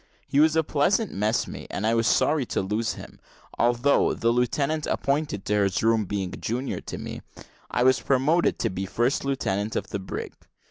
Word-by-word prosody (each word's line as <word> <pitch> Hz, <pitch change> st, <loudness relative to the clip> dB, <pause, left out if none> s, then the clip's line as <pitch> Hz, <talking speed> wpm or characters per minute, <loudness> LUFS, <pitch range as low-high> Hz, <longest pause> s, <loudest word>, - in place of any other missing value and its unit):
He 140 Hz, -, +1 dB
was 155 Hz, +1 st, +5 dB
a 160 Hz, -, +3 dB
pleasant 175 Hz, +10 st, +1 dB
messmate, 105 Hz, +4 st, -1 dB
and 105 Hz, -, -3 dB
I 115 Hz, -, +3 dB
was 115 Hz, 0 st, +2 dB
sorry 150 Hz, -2 st, +3 dB
to -, -, -1 dB
lose 105 Hz, +4 st, -1 dB
him: -, -, -11 dB, 0.4 s
although 120 Hz, +4 st, +3 dB
the 115 Hz, -, +1 dB
lieutenant 140 Hz, +6 st, 0 dB
appointed 140 Hz, -7 st, -1 dB
in 105 Hz, 0 st, +2 dB
his 100 Hz, 0 st, 0 dB
room 115 Hz, -1 st, +3 dB
being 95 Hz, -1 st, -3 dB
junior 125 Hz, +4 st, -3 dB
to -, -, -7 dB
me -, -, -7 dB, 0.5 s
I 125 Hz, -, +1 dB
was 130 Hz, -2 st, +4 dB
promoted 140 Hz, +8 st, +2 dB
to -, -, -1 dB
be 95 Hz, +1 st, -4 dB
first 120 Hz, +6 st, 0 dB
lieutenant 110 Hz, -6 st, -1 dB
of -, -, -3 dB
the 100 Hz, -, -2 dB
brig. 95 Hz, -, -6 dB
120 Hz, 185 wpm, -25 LUFS, 105-140 Hz, 0.5 s, was